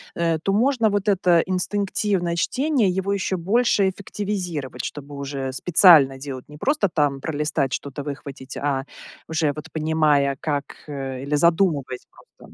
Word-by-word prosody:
э, 165 -1 0
то 195 - 0
можно 235 +1 +2
вот 205 0 -1
это 180 -4 +3
инстинктивное 190 -1 -1
чтение, 260 - +1
его 190 +2 -1
ещё 190 -1 -1
больше 200 +2 +2
эффективизировать. 185 -7 -4
Чтобы 145 0 -7
уже 140 -1 -4
специально 155 -3 +6
делать, 135 -1 -8
не 150 - -11
просто 280 - +1
там 145 -4 0
пролистать, 150 -3 -1
что-то 140 +2 -5
выхватить, 140 -2 -7
а 140 -1 -1 0.4
уже 160 -2 0
вот, 155 +2 -9
понимая, 155 -3 +2
как, 145 -4 -1 0.2
э, 135 -3 -5
или 140 +2 -1
задумываясь 160 -5 +1
просто. - - -19
160 Hz, 145 wpm, -23 LUFS, 140-190 Hz, 0.4 s, специально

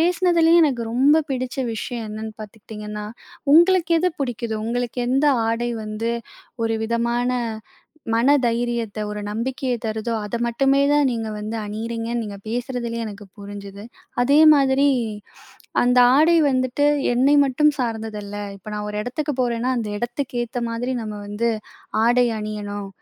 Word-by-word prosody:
பேசினதுலயே 345 -1 +4
எனக்கு 250 -6 0
ரொம்ப 285 +6 +4
பிடிச்ச 255 -1 -3 0.2
விஷயம் 230 +1 -4
என்னன்னு 215 0 -6
பாத்துக்கிட்டீங்கன்னா, 210 0 -8 0.5
உங்களுக்கு 345 0 +5
எது 360 +1 +2
புடிக்குதோ, 235 -4 -2
உங்களுக்கு 245 +1 -2
எந்த 270 +3 +2 0.2
ஆடை 240 +1 -1
வந்து 215 +2 -3 0.5
ஒரு 225 0 0
விதமான 235 +2 0 0.8
மன 235 +4 +3
தைரியத்த, 235 -2 -1
ஒரு 210 0 -4
நம்பிக்கைய 250 +4 -2
தருதோ, 220 +1 -2
அத 220 +3 -3
மட்டுமே 270 +4 +2
தான் 290 -1 +4
நீங்க 225 -2 -3
வந்து 215 +2 -4
அணியிறீங்கன்னு 230 +2 -3
நீங்க 200 -1 -7
பேசுறதுலயே 235 -1 -3
எனக்கு 205 -1 -8
புரிஞ்சிது. 200 0 -9 0.4
அதே 275 +4 +4 0.2
மாதிரி, 275 0 +3 1.0
"அந்த 250 +1 +3 0.2
ஆடை 320 +4 +5
வந்துட்டு, 255 +2 +1 0.3
என்னை 265 +4 +4
மட்டும் 300 +3 +3
சார்ந்ததுல்ல. 220 -4 -4 0.2
இப்போ 195 +2 -13
நான் 210 0 -4
ஒரு 210 - -5
எடத்துக்கு 280 +5 -3
போறேன்னா, 240 0 0
அந்த 220 -2 -3
எடத்துக்கு 240 +3 -4
ஏத்த 240 +1 -4
மாதிரி 245 +3 -2
நம்ம 215 -1 -5
வந்து 210 +3 -1 0.6
ஆடை 245 +1 +4
அணியணும்" 205 -1 -5
235 Hz, 135 wpm, -22 LUFS, 215-260 Hz, 1.0 s, உங்களுக்கு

